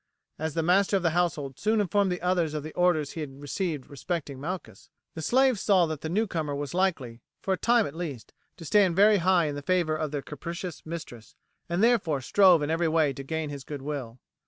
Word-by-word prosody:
As 160 -1 -3
the 165 - +1
master 195 +4 +3
of 185 - -4
the 170 - +2
household 155 -6 -1
soon 215 +1 +1
informed 200 0 +1
the 180 -1 -4
others 175 -4 +1
of 150 - -3
the 155 - -8
orders 175 -5 +2
he 160 - -6
had 135 -2 -7
received 150 0 -3
respecting 145 -1 -5
Malchus, 180 +5 -6 0.2
the 160 - -6
slaves 255 - +3
saw 190 -4 +4
that 155 -3 -5
the 160 - -4
newcomer 170 -7 -1
was 145 +2 -4
likely, 155 -11 -1 0.2
for 195 - -1
a - - +2
time 235 +1 +3
at 140 - -6
least, 155 -8 -6 0.2
to 165 - -10
stand 190 0 +3
very 205 +2 +6
high 180 -1 +3
in 150 - -2
the 145 - -5
favour 170 0 +1
of 155 -1 -2
their 145 -1 -4
capricious 170 +4 -7
mistress, 150 -9 -8 0.3
and 175 +4 0
therefore 200 - +3
strove 180 +3 +5
in 145 - -1
every 165 +1 +1
way 155 -3 +2
to 135 - -7
gain 155 +1 -3
his 140 -2 -7
goodwill. 140 -4 -6
165 Hz, 215 wpm, -27 LUFS, 145-185 Hz, 0.3 s, very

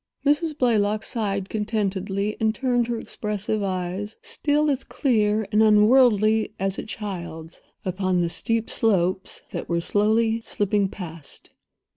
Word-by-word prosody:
Mrs. 300 +2 +2
Blaylock 215 -4 +2
sighed 200 -5 -2
contentedly, 205 -1 -2
and 220 0 +1
turned 245 -1 +1
her 240 -1 -2
expressive 210 -1 -3
eyes—still 205 - -1
as 270 -1 -1
clear 215 -5 +1
and 210 - +4
unworldly 215 0 +4
as 195 0 -1
a - - -4
child's—upon 185 -1 -4
the 170 - 0
steep 225 +5 0
slopes 190 -4 0
that - - -5
were 170 0 +1
slowly 220 +5 +2
slipping 205 -2 0
past. 165 -6 -8
210 Hz, 120 wpm, -24 LUFS, 190-225 Hz, -, and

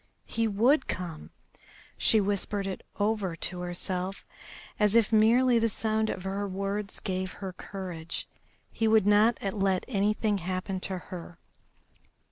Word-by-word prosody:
He 230 0 0
would 240 +8 +3
come! 170 -4 -5 0.7
She 220 - +3
whispered 200 0 -1
it 195 -1 -4 0.2
over 205 -4 0
to 180 +2 -3
herself 180 +2 -4 0.5
as 210 0 +3
if 230 -1 +4
merely 235 +3 +5
the 230 0 +2
sound 220 +1 +1
of 185 - -4
the 195 +1 -2
words 200 +1 -3
gave 185 -1 -3
her 190 -2 -6
courage. 180 -4 -6 0.4
He 225 - 0
would 220 -2 +5
not 210 +3 +5 0.2
let 195 -2 +1
anything 210 -1 +1
happen 185 +2 -3
to 185 0 -3
her. 175 -1 -9
200 Hz, 135 wpm, -29 LUFS, 185-220 Hz, 0.7 s, merely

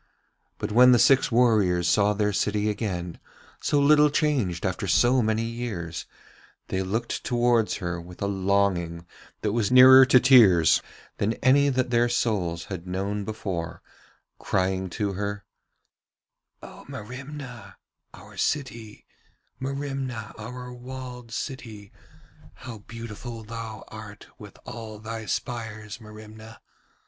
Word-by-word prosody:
But 105 - -4
when 125 +3 +7
the - - +6
six 135 +2 +4
warriors 105 -8 +3
saw 105 +4 +3
their 105 0 0
city 105 +2 0
again, 90 -6 -4 0.4
so 145 - +1
little 150 +1 +5
changed 135 - 0
after - - -2
so 125 +1 +4
many 110 0 0
years, 110 -9 -5 0.6
they 95 - -1
looked 110 +5 -3
towards 120 -2 +2
her 85 -3 -4
with 90 +1 -13
a 100 - -2
longing 95 -4 0 0.4
that 105 - 0
was 110 -1 0
nearer 130 +1 +9
to 130 -1 +6
tears 110 - +6 0.4
than 110 +3 0
any 140 +3 +3
that 130 -2 0
their 120 0 +3
souls 95 -8 -1
had 90 -2 -7
known 100 +3 -3
before, 95 -6 -5 0.6
crying 95 0 -1
to 100 +1 -2
her: 100 +1 -4 1.2
'O - - -11
Merimna, 125 +2 -9 0.4
our - - -15
city: 115 -7 -3 0.5
Merimna, 135 -4 -4
our 125 +3 -8
walled 125 -1 -9
city. 110 -6 -7 0.6
'How 120 -4 -9
beautiful 115 +1 -8
thou 110 -1 -7
art 110 -2 -10
with - - -12
all 110 -2 -8
thy 110 0 -7
spires, 110 -1 -5
Merimna. 110 +1 -12
110 Hz, 125 wpm, -25 LUFS, 100-125 Hz, 1.2 s, nearer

